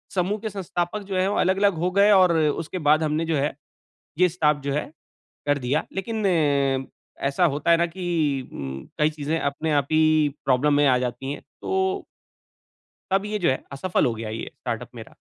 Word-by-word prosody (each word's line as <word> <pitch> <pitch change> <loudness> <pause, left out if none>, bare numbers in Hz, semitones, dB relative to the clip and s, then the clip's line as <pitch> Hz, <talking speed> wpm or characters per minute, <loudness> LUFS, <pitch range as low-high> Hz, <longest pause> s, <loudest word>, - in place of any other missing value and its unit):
समूह 190 +3 0
के 220 - -3
संस्थापक 185 0 -3
जो 190 - -2
हैं, 185 +1 +2
वो 205 - 0
अलग-अलग 195 +2 +3
हो 180 - +2
गए 205 +1 +6
और 185 -4 +5
उसके 160 +3 -1
बाद 155 +1 +5
हमने 155 +1 0
जो 165 -1 0
है 140 +2 0 0.7
ये 180 - +5
स्टाफ 155 -4 +2
जो 140 0 -1
है 150 - 0 0.6
कर 145 0 +2
दिया। 140 +5 +1
लेकिन 215 +2 -3
अ, 140 -6 +2 0.4
ऐसा 140 +6 +2
होता 150 +3 0
है 170 - +7
ना 170 +1 +2
कि 160 -7 -1
उम, 65 -1 -6
कई 150 +1 +3
चीज़ें 150 +1 -2
अपने 150 +2 -1
आप 135 - -20
ही 155 0 +4 0.4
प्रॉब्लम 140 +3 +3
में 145 0 +4
आ 125 -2 +4
जाती 125 +2 -3
है, - - -7 0.2
तो 385 +1 -1 1.1
तब 195 +1 +2
ये 210 0 -2
जो 175 - +2
है, 130 - -1
असफल 175 +6 0
हो 120 - +1
गया 110 0 -5
ये, 110 +1 -5
स्टार्टअप 120 -1 -4
मेरा। 115 - -11
155 Hz, 195 wpm, -24 LUFS, 140-185 Hz, 1.1 s, है